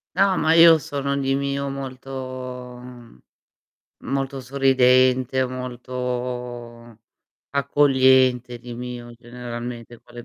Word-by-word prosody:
No, 195 -1 +3
ma 160 - +3
io 165 -1 +8
sono 140 -1 -3
di 135 -1 0
mio 140 0 -2
molto 130 -2 -7
mhmm, 120 - -14 0.9
molto 135 0 -3
sorridente, 130 -1 +3
molto 125 -2 -6 0.5
accogliente 130 -3 +3
di 120 0 -9
mio, 120 0 -7
generalmente 120 0 -8
con 120 - -20
le 120 -1 -9
125 Hz, 100 wpm, -22 LUFS, 120-135 Hz, 0.9 s, io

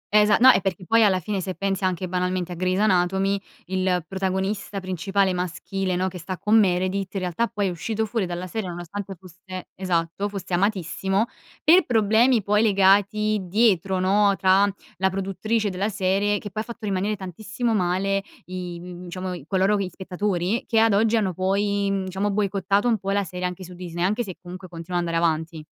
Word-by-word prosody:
Esa 210 0 +6
no, 260 +2 +9
e 215 - +2
perché 185 -1 -3
poi 225 +6 +4
alla 190 -3 +4
fine 195 +2 -3
se 185 0 -4
pensi 195 -1 -2
anche 185 0 -1
banalmente 180 0 -1
a - - -4
Grey's 185 +1 0
anatomy, 195 0 +2 0.2
il 185 -2 0
protagonista 190 +1 -2
principale 190 +1 0
maschile, 180 +1 -2
no, 185 +1 0
che 185 -1 -6
sta 185 +2 -5
con 215 +2 +4
Meredith, 185 0 0
in 195 - -1
realtà 180 +6 0
poi 210 -3 -2
è - - +1
uscito 220 +6 -2
fuori 215 -3 -1
dalla 175 +1 -4
serie 190 +1 -4
nonostante 185 +3 -6
fosse 185 +1 -10
esatto, 180 +1 -1
fosse 190 -3 -6
amatissimo, 195 +1 0 0.4
per 350 +4 +6
problemi 225 0 +3
poi 210 +1 +2
legati 205 +1 +3
dietro, 190 -1 +2
no, 200 +2 +3
tra 195 +2 +4 0.3
la 190 +1 +2
produttrice 195 +3 -1
della 190 +3 -1
serie 205 +1 +1
che 205 - -7
poi 215 - -3
ha - - -7
fatto 235 -2 -8
rimanere 200 +1 0
tantissimo 215 +5 -3
male 195 +1 +1 0.2
i, 180 -1 -6
mhmm, 180 0 -9
diciamo 185 +1 -5
i 170 -6 -8
coloro 195 +3 +2
gli 190 -2 -2
spettatori, 185 +3 -2
che 225 - 0
ad 225 -2 +4
oggi 225 +2 +3
hanno 195 -4 0
poi, 200 +2 0
mhmm, 195 -1 0
diciamo 190 +2 -1
boicottato 200 +1 +1
un 225 -4 +2
po' 195 - -5
la 200 0 +1
sere 180 0 -5
anche 180 +1 -4
su 180 0 -10
Disney, 175 -1 -5
anche 210 +6 +1
se 190 -5 -7
comunque 185 +1 -9
continua 175 +1 -4
ad 175 - -2
andare 165 0 +1
avanti. 160 -1 -2
190 Hz, 195 wpm, -24 LUFS, 180-205 Hz, 0.4 s, no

